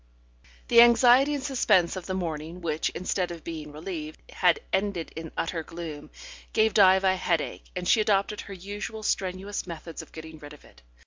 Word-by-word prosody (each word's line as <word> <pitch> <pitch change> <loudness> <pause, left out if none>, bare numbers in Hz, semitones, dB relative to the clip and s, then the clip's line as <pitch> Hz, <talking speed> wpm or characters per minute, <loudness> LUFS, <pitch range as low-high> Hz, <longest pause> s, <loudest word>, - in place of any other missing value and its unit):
The 235 -1 +8
anxiety 245 +4 +6
and 275 - -4
suspense 210 - +2
of 185 -2 -7
the 185 - -2
morning, 165 -1 -4
which, 160 -3 -1
instead 185 0 -1
of 170 -2 -8
being 155 -3 -7
relieved, 155 0 -7
had 180 - +3
ended 190 -4 -1
in 160 0 -7
utter 165 0 -2
gloom, 160 -2 -8 0.4
gave 220 -1 +3
Diva 190 -1 +5
a - - 0
headache, 170 -4 -2
and 180 -1 -3
she 220 - +5
adopted 205 0 +1
her 200 - -9
usual 205 +4 -6
strenuous 190 0 -2
methods 165 -1 -7
of - - -15
getting 160 0 -10
rid 145 -1 -11
of 150 - -16
it. - - -20
180 Hz, 180 wpm, -27 LUFS, 160-205 Hz, 0.4 s, The